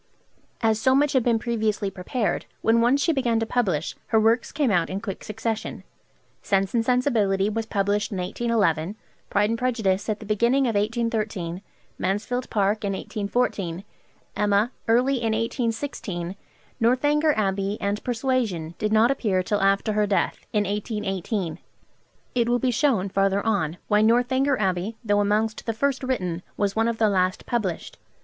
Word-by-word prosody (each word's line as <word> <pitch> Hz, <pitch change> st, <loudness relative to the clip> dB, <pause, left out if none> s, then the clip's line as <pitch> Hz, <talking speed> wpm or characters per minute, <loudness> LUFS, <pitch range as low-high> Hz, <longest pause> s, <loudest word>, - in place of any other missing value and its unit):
As 220 Hz, -1 st, +2 dB
so 260 Hz, +2 st, +4 dB
much 290 Hz, +1 st, +3 dB
had 260 Hz, -, +4 dB
been 235 Hz, -1 st, +2 dB
previously 220 Hz, -3 st, -1 dB
prepared, 200 Hz, +5 st, -2 dB, 0.2 s
when 230 Hz, +1 st, +4 dB
once 255 Hz, +4 st, +3 dB
she 330 Hz, -, +2 dB
began 240 Hz, -5 st, +1 dB
to 225 Hz, -, 0 dB
publish, 190 Hz, -11 st, -1 dB
her 220 Hz, -, +3 dB
works 225 Hz, +2 st, +2 dB
came 285 Hz, -5 st, +1 dB
out 175 Hz, -3 st, +2 dB
in 190 Hz, -, -3 dB
quick 200 Hz, -3 st, -6 dB
succession. 220 Hz, +1 st, -4 dB, 0.6 s
'Sense 195 Hz, -1 st, 0 dB
and 230 Hz, -2 st, +2 dB
Sensibility' 220 Hz, -6 st, +2 dB
was 225 Hz, +1 st, -3 dB
published 205 Hz, 0 st, 0 dB
in 195 Hz, -, -3 dB
1811, 185 Hz, -3 st, 0 dB, 0.3 s
'Pride 205 Hz, +2 st, +2 dB
and 230 Hz, -, -1 dB
Prejudice' 220 Hz, -6 st, 0 dB
at 215 Hz, -, -1 dB
the 215 Hz, -, -9 dB
beginning 235 Hz, +6 st, +2 dB
of 235 Hz, -, 0 dB
1813, 215 Hz, -5 st, -1 dB, 0.4 s
'Mansfield 220 Hz, +6 st, -1 dB
Park' 210 Hz, 0 st, +1 dB
in 200 Hz, -1 st, -1 dB
1814, 200 Hz, -3 st, -2 dB, 0.5 s
'Emma' 210 Hz, +3 st, +2 dB, 0.2 s
early 250 Hz, +4 st, +3 dB
in 225 Hz, -2 st, 0 dB
1816; 225 Hz, -5 st, -3 dB, 0.4 s
'Northanger 290 Hz, +6 st, +3 dB
Abbey' 200 Hz, 0 st, 0 dB
and 200 Hz, +1 st, -2 dB
'Persuasion' 230 Hz, -10 st, -1 dB
did 210 Hz, 0 st, 0 dB
not 220 Hz, +3 st, +5 dB
appear 200 Hz, -9 st, 0 dB
till 205 Hz, +2 st, 0 dB
after 195 Hz, +2 st, +2 dB
her 210 Hz, 0 st, +2 dB
death, 200 Hz, -, -1 dB
in 210 Hz, -1 st, +2 dB
1818. 200 Hz, -3 st, -3 dB, 0.7 s
It 235 Hz, -1 st, +1 dB
will 245 Hz, -, +3 dB
be 250 Hz, +1 st, +1 dB
shown 240 Hz, -6 st, +2 dB
farther 195 Hz, +1 st, +1 dB
on 180 Hz, -7 st, 0 dB
why 210 Hz, 0 st, +3 dB
'Northanger 255 Hz, +4 st, +3 dB
Abbey,' 190 Hz, +2 st, -1 dB
though 205 Hz, -1 st, +3 dB
amongst 215 Hz, +2 st, 0 dB
the 225 Hz, -, 0 dB
first 270 Hz, +4 st, 0 dB
written, 185 Hz, -10 st, -2 dB, 0.2 s
was 200 Hz, -1 st, 0 dB
one 225 Hz, +1 st, +2 dB
of 230 Hz, -1 st, -1 dB
the 220 Hz, -, +3 dB
last 185 Hz, -2 st, +1 dB
published. 210 Hz, -8 st, -3 dB
215 Hz, 160 wpm, -24 LUFS, 195-235 Hz, 0.7 s, not